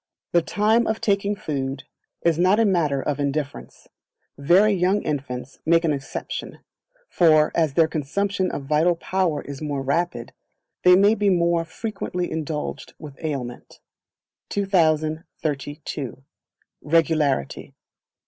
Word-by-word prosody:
The 170 - +4
Time 215 +7 +2
of 220 0 -1
Taking 200 0 0
Food 135 -8 -4 0.4
is 170 -1 +2
not 185 +4 +4
a 225 - +4
matter 155 -8 +1
of 145 -1 -2
indifference; 145 0 -4 0.5
very 185 +9 +4
young 190 +2 +1
infants 135 -3 -4
make 165 +1 +3
an 155 - +2
exception; 140 -1 -6 0.5
for, 155 - +4
as 155 -5 +1
their 165 -1 +5
consumption 185 +6 -1
of 140 - -5
vital 155 +5 +2
power 175 -3 -1
is 140 0 -8
more 145 -3 -3
rapid, 140 -4 -2 0.5
they 180 0 +7
may 200 +3 +5
be 205 -2 +1
more 170 -2 +2
frequently 180 -1 -4
indulged 155 -1 -4
with 150 0 -12
aliment. 130 -6 -5 0.7
2032. 155 - -1 0.6
Regularity. 155 - 0
160 Hz, 120 wpm, -23 LUFS, 145-185 Hz, 0.7 s, they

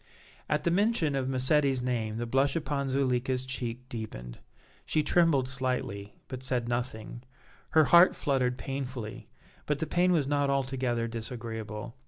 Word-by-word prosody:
At 150 0 +1
the 170 - +2
mention 185 -6 +2
of 130 -1 -1
Massetti's 135 0 +2
name 115 -3 -1
the 120 - -2
blush 135 +3 +2
upon 140 -3 -1
Zuleika's 130 -1 0
cheek 125 -1 -5
deepened. 105 - -7 0.4
She 155 - +1
trembled 150 -5 +3
slightly, 125 -6 -3
but 130 -1 -6
said 125 -2 -1
nothing; 120 -1 -3 0.6
her 155 - +8
heart 170 +4 +7
fluttered 130 -3 0
painfully, 130 -4 -5 0.4
but 150 - +1
the 160 - -2
pain 175 +3 +2
was 160 -6 +3
not 145 0 +1
altogether 130 -3 0
disagreeable. 115 -2 -6
130 Hz, 145 wpm, -29 LUFS, 120-140 Hz, 0.6 s, her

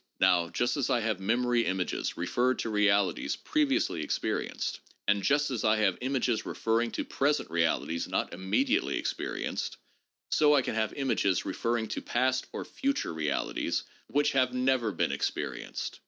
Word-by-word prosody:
Now, 90 -2 +4
just 120 - 0
as 140 - 0
I 120 - +2
have 110 -3 -1
memory 120 +4 +2
images 95 -2 -2
referred 125 +9 +1
to 115 - -3
realities 100 -3 +2
pre 305 -1 +1
viously 85 - 0
experienced, - - -2 0.3
and 100 - +3
just 145 +6 +2
as 120 - -2
I 110 0 +4
have 100 -4 +1
images 130 -3 0
referring 115 +1 0
to - - -2
present 145 - 0
realities 85 0 0
not - - -1
immediately 265 - +1
experienced, - - -3 0.5
so 150 -1 +5
I 135 - +3
can - - -2
have 110 0 0
images 125 -9 +1
re - - -3
ferring 115 -1 -1
to - - -3
past 130 +1 0
or - - -5
future 275 - -1
realities 75 -3 -1 0.2
which 145 +1 +2
have 130 -1 +2
never 125 -3 +2
been - - 0
experi - - -2
enced. - - -5
115 Hz, 165 wpm, -29 LUFS, 95-130 Hz, 0.5 s, so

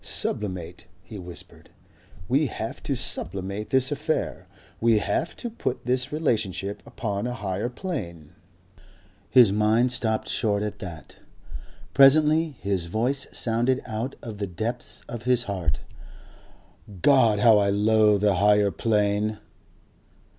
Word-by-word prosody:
"Sublimate," 90 -4 -1 0.2
he 100 +2 -9
whispered. 90 -1 -6 0.6
"We 140 +6 +2
have - - -6
to - - -2
sublimate 100 +4 -1
this 130 +1 +3
affair. 150 +2 -2 0.3
We 115 -1 +3
have 105 0 -1
to - - -5
put 220 - -4
this 125 +2 +1
relationship 105 - -1
upon 105 0 -3
a 125 - -4
Higher 100 +1 -3
Plane." 85 - -6 1.0
His 120 -6 +6
mind 110 +4 +2
stopped 110 -3 0
short 105 -2 0
at 105 - -5
that. 85 -4 -9 0.8
Presently 155 +2 +5
his 95 -4 -1
voice 125 +9 -1
sounded 120 +3 0
out 110 +5 -4
of 110 -3 -7
the 100 - -2
depths 110 +7 -5
of 120 -1 -7
his 125 -1 +2
heart. 85 - -2 1.2
"God! 125 -7 +5
How 110 -1 +6
I 100 -1 +2
loathe 105 0 +3
the 105 -3 +2
Higher 105 0 +4
Plane!.... 105 0 0
110 Hz, 125 wpm, -25 LUFS, 100-125 Hz, 1.2 s, His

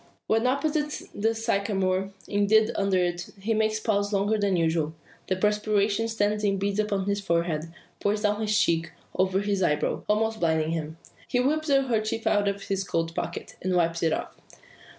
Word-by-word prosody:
When 225 +3 +2
opposite 295 +3 0
the 225 +2 0
sycamore 195 -4 0 0.2
indeed 215 +2 +3
under 195 -1 +1
it 175 -1 -1
he 220 +4 0
makes 215 0 +1
pause 205 -2 0
longer 205 +2 +2
than 200 -2 +2
usual. 160 -1 0 0.3
The 185 - +1
perspiration 210 +2 +1
stands 210 -1 0
in 200 -1 +2
beads 200 +1 -1
upon 200 -2 0
his 200 0 0
forehead, 170 -3 -1 0.3
pours 210 +1 0
down 210 +1 +1
his 210 0 +2
cheeks, 165 -6 +1 0.3
over 190 +1 +2
his 200 -1 -1
eyebrows, 150 -4 0
almost 220 +1 +1
blinding 160 -1 +1
him. 160 -1 -4 0.3
He 245 - +1
whips 310 +4 +1
a 275 -1 +4
kerchief 225 -2 -1
out 205 -1 +2
of 200 0 -2
his 195 -1 -1
coat 165 -3 -2
pocket, - - -5
and 185 0 0
wipes 170 -1 +1
it 165 - +2
off. - - -3
200 Hz, 175 wpm, -26 LUFS, 185-220 Hz, 0.3 s, a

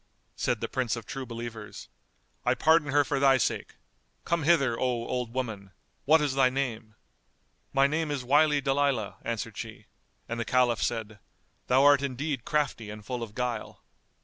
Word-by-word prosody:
Said - - -1
the - - -1
Prince 125 -3 -1
of 115 - -8
True 135 -2 -6
Believers, 115 -2 -7 0.6
"I - - +2
pardon 160 -1 +3
her 145 +1 +4
for 140 -1 -1
thy 135 -1 +5
sake: - - -2 0.5
come 170 -1 0
hither, 140 -8 +4
O - - -7
old 125 -1 -1
woman; 110 -7 -4 0.3
what 155 +3 +5
is 145 -3 0
thy 135 -1 +4
name?" 120 -5 -3 0.8
"My 135 0 +4
name 155 +2 0
is 145 -3 -2
Wily 145 +3 +4
Dalilah," 135 -6 0
answered 115 -1 -4
she, 110 -2 -8 0.4
and 115 0 -4
the - - 0
Caliph 120 -2 +2
said 110 -3 -2 0.5
"Thou 130 +2 +4
art 145 -1 +6
indeed 140 -1 -3
crafty 145 -8 -1
and 105 0 -9
full 125 -2 -4
of 110 -2 -7
guile." 125 -3 -4
125 Hz, 170 wpm, -28 LUFS, 115-140 Hz, 0.8 s, art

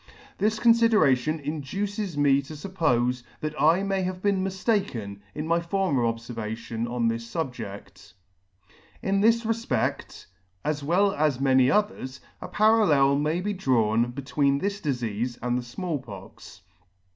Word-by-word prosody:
This 215 +2 +1
confideration 215 - +3
induces 170 +6 -4
me 140 -1 +4
to 140 +3 -10
fuppofe 145 -8 0 0.2
that 155 0 -3
I 165 +6 +4
may 195 -1 0
have 185 0 -3
been 195 -1 +1
miftaken 190 - -2 0.2
in 150 - -3
my 165 +1 +2
former 170 -5 0
obfervation 115 0 -4
on 120 -1 0
this 115 0 -3
fubje6fc 120 - -6 0.9
In 195 +1 +1
this 230 +2 +4
refpect, 225 +1 -2 0.4
as 150 -1 -1
well 190 +6 +2
as 145 -3 +1
many 130 -1 +4
others, 170 -9 -1 0.2
a - - -6
parallel 195 -11 +4
may 155 +4 0
be 205 +2 -2
drawn 120 - +1
between 140 +2 0
this 200 +5 -3
difeafe 120 -4 -2
and 125 0 -1
the 125 - 0
Small 145 +6 -4
Pox. 100 -7 -12
150 Hz, 135 wpm, -26 LUFS, 125-195 Hz, 0.9 s, me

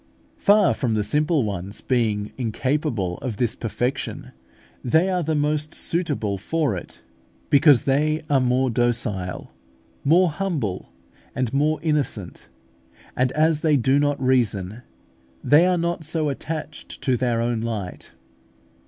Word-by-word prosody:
Far 205 -2 +4
from 120 -5 -1
the 105 - +1
simple 150 +6 +1
ones 100 -1 -4
being 110 -5 0
incapable 120 - -2
of 120 -6 -5
this 120 -1 0
perfection, 125 +4 -3 0.5
they 160 +10 +2
are 180 -1 0
the 160 -1 -1
most 150 +1 -1
suitable 145 - -1
for 150 - -1
it, 65 -6 -8 0.5
because 145 -3 +6
they 155 +3 +1
are 140 -2 +3
more 125 +1 +1
docile, 115 -6 -1 0.5
more 170 +4 +4
humble, 150 - -3 0.5
and 130 -1 -1
more 150 +2 +1
innocent; 145 - -2 0.7
and 125 0 +1
as 155 0 +2
they 155 -3 +3
do 130 +3 +2
not 145 0 +1
reason, 115 -5 0 0.6
they 155 +5 +5
are 180 -1 +2
not 170 0 -2
so 155 -1 -1
attached 155 +2 -6
to 130 - +2
their 120 -1 0
own 115 -1 -1
light. 110 -6 -5
130 Hz, 135 wpm, -23 LUFS, 115-155 Hz, 0.7 s, because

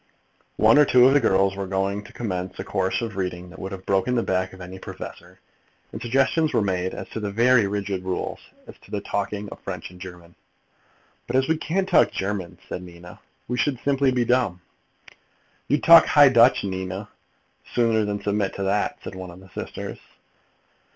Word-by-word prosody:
One 145 - +6
or 150 - +7
two 125 -2 +6
of 135 - +6
the 145 - +5
girls 95 -4 +2
were 100 -1 -4
going 100 +2 -1
to - - -13
commence 95 -5 -4
a - - -4
course 95 +3 -1
of 110 -3 -5
reading 90 -2 -4
that 95 - -12
would 95 - -6
have 95 -1 -8
broken 100 +6 +1
the 120 - +1
back 95 0 -1
of 95 - -13
any 90 +1 -9
professor, - - -10 0.5
and - - -7
suggestions 135 +6 +1
were 115 - +3
made 95 -1 -1
as - - -7
to - - -5
very 115 0 +4
rigid 100 -2 -3
rules 95 -1 -3 0.3
as - - -11
to - - -20
the 105 - -3
talking 100 +1 -3
of - - -10
French 90 -2 -6
and 90 0 -15
German. 90 -2 -11 0.9
"But 120 - -3
as 130 0 +3
we 160 - +2
can't 180 +5 -1
talk 180 - +4
German," 95 -3 -4
said - - -5
Nina, 90 -1 -12 0.3
"we 125 +1 -2
should 135 -5 0
simply 140 -1 +2
be 125 -1 +1
dumb." 120 -8 +1 1.1
"You'd 145 - +1
talk 170 +1 +9
High 145 -2 +7
Dutch, 120 0 +5
Nina, 95 +1 -4 0.7
sooner 115 -2 +3
than 105 -1 -3
submit 100 -1 -1
to 100 - -3
that," 100 +2 0
said - - -7
one 95 -1 -8
of 85 +1 -12
the 95 0 -16
sisters. - - -7
100 Hz, 195 wpm, -24 LUFS, 95-125 Hz, 1.1 s, talk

